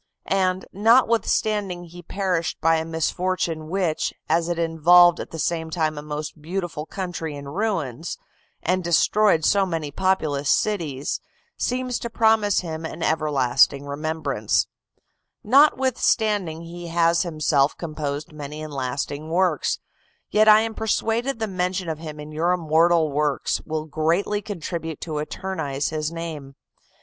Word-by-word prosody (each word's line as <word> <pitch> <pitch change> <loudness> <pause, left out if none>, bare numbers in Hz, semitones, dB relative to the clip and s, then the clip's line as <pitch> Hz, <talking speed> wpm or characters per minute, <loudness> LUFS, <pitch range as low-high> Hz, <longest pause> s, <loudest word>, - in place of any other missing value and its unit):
And, 185 -1 0
notwithstanding 215 -4 +2
he 175 +1 -11
perished 180 -1 -2
by 165 +1 +3
a 160 - -2
misfortune 165 0 -1
which, 180 -4 -1
as 165 +2 +1
it 175 - -1
involved 170 +1 +5
at - - -6
the 165 - -7
same 160 0 -1
time 155 -1 0
a 145 - -5
most 150 +1 -6
beautiful 170 -2 -4
country 175 -5 -4
in 140 0 -8
ruins, 165 - -2 0.5
and 185 +2 +1
destroyed 170 +1 +3
so 200 -1 +4
many 165 -5 -3
populous 155 -6 0
cities, 160 -10 0 0.4
seems 250 0 -1
to 235 - -4
promise 220 -3 +3
him 160 -2 -5
an 160 +1 -5
everlasting 140 -3 +2
remembrance; 145 -6 -1 0.8
notwithstanding 220 - +3
he 170 +1 -8
has 170 0 +3
himself 155 -4 +1
composed 150 -2 -4
many 150 +1 -7
and 155 -1 -7
lasting 140 +3 -3
works; 180 +2 +1 0.5
yet 215 +1 +4
I 215 0 +8
am 225 0 -2
persuaded 225 +4 0
the 225 - -1
mention 185 -2 -2
of 155 -1 -3
him 155 -2 -8
in 150 +1 -8
your 165 +4 +1
immortal 165 -1 +3
works 145 0 0
will 155 0 -2
greatly 165 +7 0
contribute 165 -5 -5
to 155 -3 -3
eternize 150 -3 -3
his 155 0 -2
name. 160 -5 -6
165 Hz, 140 wpm, -23 LUFS, 155-190 Hz, 0.8 s, I